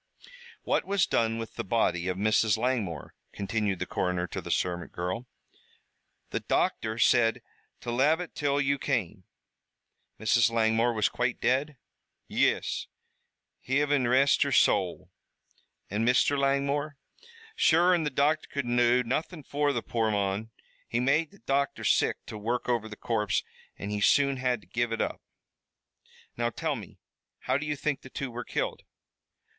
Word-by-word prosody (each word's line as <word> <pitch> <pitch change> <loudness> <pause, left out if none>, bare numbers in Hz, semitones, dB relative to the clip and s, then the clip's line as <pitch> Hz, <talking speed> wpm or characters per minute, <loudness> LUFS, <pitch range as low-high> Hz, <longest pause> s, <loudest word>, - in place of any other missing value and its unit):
"What - - +1
was 200 -2 +2
done 115 0 +1
with 115 -1 -7
the - - -2
body 90 -4 0
of 90 0 -1
Mrs. 110 +1 +3
Langmore?" 110 - -2 0.2
continued 100 -1 -1
the 90 - -3
coroner 90 -1 -1
to - - -4
the - - -9
servant 90 -1 -1
girl. 90 +8 -4 1.0
"The - - -1
docther 110 0 0
said 115 -1 +3 0.4
to 120 - -4
lave 145 +7 +3
it 180 - -6
till 145 -1 0
you 140 0 +1
came." 105 - -2 0.9
"Mrs. 110 +1 +3
Langmore 115 +1 +2
was 110 -2 +2
quite 120 0 -1
dead?" 135 +3 0 0.5
"Yis. - - 0 0.8
Hivin 140 -1 +1
rest 135 +3 +4
her - - +2
sowl!" - - +2 0.8
"And 105 +3 -1
Mr. 125 +4 +3
Langmore?" 140 +1 0 0.6
"Sure 175 - +4
an' 175 - +2
the 150 - 0
docther 145 +3 +1
could 140 -2 -2
do 120 +1 +3
nothin' 155 +6 -3
fer 145 +1 0
the 120 -4 -2
poor 115 -2 0
mon. 100 +1 -1 0.4
It 120 - 0
made 145 +5 +2
the 200 - -19
docther 140 0 -1
sick - - +2
to 105 - -7
work 120 +4 -2
over 115 -3 0
the 105 - -8
corpse 105 -3 0 0.3
an' 100 - -5
he 105 0 -2
soon 140 +4 +4
had 125 -3 0
to - - -21
give 120 0 -1
it 115 - -2
up." - - -2 1.1
"Now, 120 0 0
tell 155 +4 -2
me, 105 -7 -10 0.4
how 130 +2 0
do 150 - -5
you 150 - -1
think 145 -1 -2
the 130 - -12
two 135 -1 -5
were 120 +1 -5
killed?" - - -3
120 Hz, 160 wpm, -28 LUFS, 110-140 Hz, 1.1 s, rest